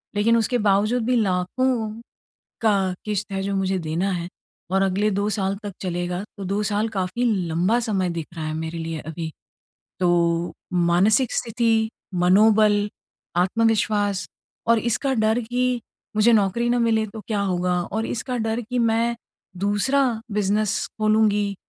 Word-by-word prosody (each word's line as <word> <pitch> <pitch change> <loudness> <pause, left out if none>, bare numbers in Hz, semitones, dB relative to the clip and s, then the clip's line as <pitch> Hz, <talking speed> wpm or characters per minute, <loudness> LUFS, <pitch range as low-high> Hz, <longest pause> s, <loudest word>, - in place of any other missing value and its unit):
लेकिन 230 +3 +3
उसके 230 +2 +1
बावजूद 215 +5 +2
भी 250 - +2
लाखों, 220 +4 -1 0.6
का 195 -4 +2
किश्त 210 -1 -2
है 195 0 -2
जो 200 0 -2
मुझे 190 0 0
देना 165 +4 -1
है 175 -1 -3 0.4
और 195 0 +2
अगले 195 +2 +1
2 200 +2 0
साल 195 -1 0
तक 205 - -4
चलेगा 175 +1 -2
तो 200 - -6
2 200 +3 -1
साल 210 +1 0
काफ़ी 195 +4 -2 0.2
लंबा 180 +9 +1
समय 195 -6 0
दिख 165 -2 -4
रहा 160 - -4
है 155 - -3
मेरे 160 +1 -4
लिए 165 -1 -4
अभी। 160 +1 -6 0.7
तो 170 -1 +1 0.2
मानसिक 180 +8 +3
स्थिति, 230 -1 +1 0.3
मनोबल, 205 +3 +4 0.5
आत्मविश्वास 205 0 +1 0.4
और 230 -1 +5
इसका 240 +4 0
डर 220 +1 +2
की 245 +1 -1 0.3
मुझे 215 +2 +5
नौकरी 220 +3 +2
ना 245 0 +2
मिले 220 -2 +2
तो 215 +1 -9
क्या 210 -3 0
होगा, 180 -2 0
और 220 +5 -3
इसका 250 +1 -3
डर 225 +1 -1
कि 245 +2 -3
मैं 230 +1 +2 0.4
दूसरा 205 +9 +2 0.3
बिज़नेस 210 +1 +1
खोलूँगी, 210 -2 +2
205 Hz, 150 wpm, -23 LUFS, 185-225 Hz, 0.7 s, और